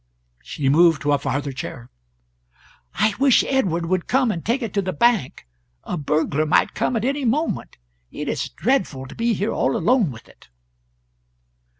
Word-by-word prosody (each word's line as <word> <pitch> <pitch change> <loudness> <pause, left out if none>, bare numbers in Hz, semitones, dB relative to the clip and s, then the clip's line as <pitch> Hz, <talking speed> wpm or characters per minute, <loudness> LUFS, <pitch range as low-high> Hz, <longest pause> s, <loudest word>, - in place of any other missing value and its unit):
She 135 - -4
moved 160 +1 +4
to 145 - +1
a 145 - +2
farther 140 +1 -2
chair... 125 -2 -8 1.0
"I 215 +3 +2
wish 270 -2 +5
Edward 180 -11 0
would 180 +1 -1
come, 260 -3 +2
and 170 -5 -5
take 240 +4 -1
it 220 - -5
to 200 - +1
the 185 -1 -3
bank; 220 - +1 0.4
a - - -4
burglar 155 0 0
might 160 - +2
come - - -1
at 225 0 -1
any 280 +2 -1
moment; 285 +7 -1 0.3
it - - -6
is - - -2
dreadful 190 - -1
to 130 - -10
be 230 -1 0
here 205 +4 -1
all 135 - 0
alone 225 - +2
with 115 -3 -11
it." - - -21
180 Hz, 175 wpm, -22 LUFS, 145-235 Hz, 1.0 s, wish